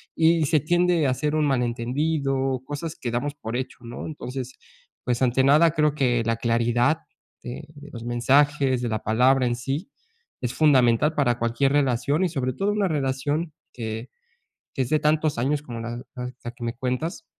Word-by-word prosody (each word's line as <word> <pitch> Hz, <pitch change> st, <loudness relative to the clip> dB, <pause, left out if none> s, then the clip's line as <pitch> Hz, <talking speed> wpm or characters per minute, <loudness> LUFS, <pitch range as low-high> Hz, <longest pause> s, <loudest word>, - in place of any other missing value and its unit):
y 165 Hz, -1 st, +4 dB
se 155 Hz, -1 st, +3 dB
tiende 175 Hz, 0 st, +2 dB
a -, -, +2 dB
hacer 150 Hz, +4 st, -1 dB
un 155 Hz, -1 st, +2 dB
malentendido, 135 Hz, +1 st, 0 dB
cosas 150 Hz, +3 st, -5 dB
que 120 Hz, -, -4 dB
damos 140 Hz, +5 st, -2 dB
por 115 Hz, -3 st, -6 dB
hecho, 130 Hz, -, -5 dB
¿no? 120 Hz, 0 st, -7 dB
Entonces, 130 Hz, -4 st, -6 dB, 0.5 s
pues, 125 Hz, +1 st, 0 dB
ante 130 Hz, +1 st, +3 dB
nada 150 Hz, +4 st, +5 dB
creo 150 Hz, -2 st, +2 dB
que 120 Hz, -4 st, +1 dB
la 115 Hz, 0 st, +1 dB
claridad 120 Hz, +5 st, +2 dB, 0.5 s
de 130 Hz, +5 st, -7 dB
de 145 Hz, +1 st, -12 dB
los 115 Hz, -2 st, -7 dB
mensajes, 130 Hz, +2 st, +2 dB
de 120 Hz, -, -1 dB
la 110 Hz, -1 st, -1 dB
palabra 125 Hz, +4 st, +3 dB
en 120 Hz, -, 0 dB
sí, 135 Hz, -, -4 dB, 0.5 s
es 125 Hz, 0 st, -2 dB
fundamental 135 Hz, -1 st, +4 dB
para 120 Hz, -4 st, +2 dB
cualquier 120 Hz, +4 st, +1 dB
relación 140 Hz, +4 st, +1 dB
y 180 Hz, -, +1 dB
sobre 130 Hz, -5 st, -2 dB
todo 195 Hz, +9 st, 0 dB
una 205 Hz, -2 st, +1 dB
relación 145 Hz, +2 st, -1 dB, 0.2 s
que, 110 Hz, 0 st, -5 dB, 0.6 s
que -, -, -1 dB
es -, -, -6 dB
de 155 Hz, 0 st, +3 dB
tantos 155 Hz, -2 st, +1 dB
años 140 Hz, +4 st, 0 dB
como 120 Hz, -5 st, -7 dB
la 120 Hz, +1 st, -5 dB, 0.4 s
la 120 Hz, -, -5 dB
que 120 Hz, 0 st, -11 dB
me 115 Hz, 0 st, -2 dB
cuentas. 130 Hz, -, -3 dB
135 Hz, 180 wpm, -24 LUFS, 120-150 Hz, 0.6 s, nada